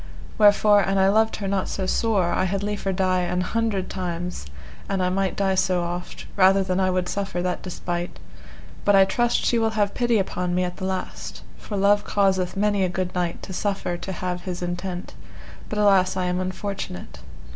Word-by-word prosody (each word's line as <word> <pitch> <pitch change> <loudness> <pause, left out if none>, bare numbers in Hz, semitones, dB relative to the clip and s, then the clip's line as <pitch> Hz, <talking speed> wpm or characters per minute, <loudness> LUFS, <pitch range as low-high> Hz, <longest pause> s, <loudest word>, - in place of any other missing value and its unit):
Wherefore 205 0 +6
an 195 0 0
I 190 0 +4
loved 220 +2 +3
her 200 - -4
not 195 -1 -1
so 190 - -2
sore, 195 -3 +1
I - - +1
had 195 +1 -1
liefer 205 -1 -2
die 185 0 +1
an 180 0 0
hundred 205 -1 -1
times, 175 - -4 0.4
an 195 - 0
I 180 0 +1
might 195 0 0
die 195 -1 +1
so 185 -1 +1
oft, 175 +1 -5
rather 195 0 +5
than 185 0 -1
I 185 -1 +2
would 180 -1 0
suffer 195 -2 -2
that 180 -1 -2
despite; 175 -1 -4 0.7
but 205 - +4
I 195 0 +7
trust 240 +5 +1
she 235 - +2
will 225 0 +2
have 205 -1 +1
pity 240 -2 +2
upon 180 -2 -1
me 180 - +2
at 180 0 -4
the 190 - -4
last, 190 0 -5 0.2
for 205 - -5
love 205 +1 +4
causeth 190 -2 +1
many 205 -1 +2
a 185 - +1
good 180 0 -3
knight 175 -2 -2
to 190 - -7
suffer 195 -2 -2
to 185 +2 -6
have 180 -1 -3
his 180 -1 -5
entent, 175 +1 -4 0.6
but 215 - -3
alas 195 -3 +4
I 185 - 0
am 180 0 0
unfortunate. 185 - -5
190 Hz, 200 wpm, -24 LUFS, 180-200 Hz, 0.7 s, I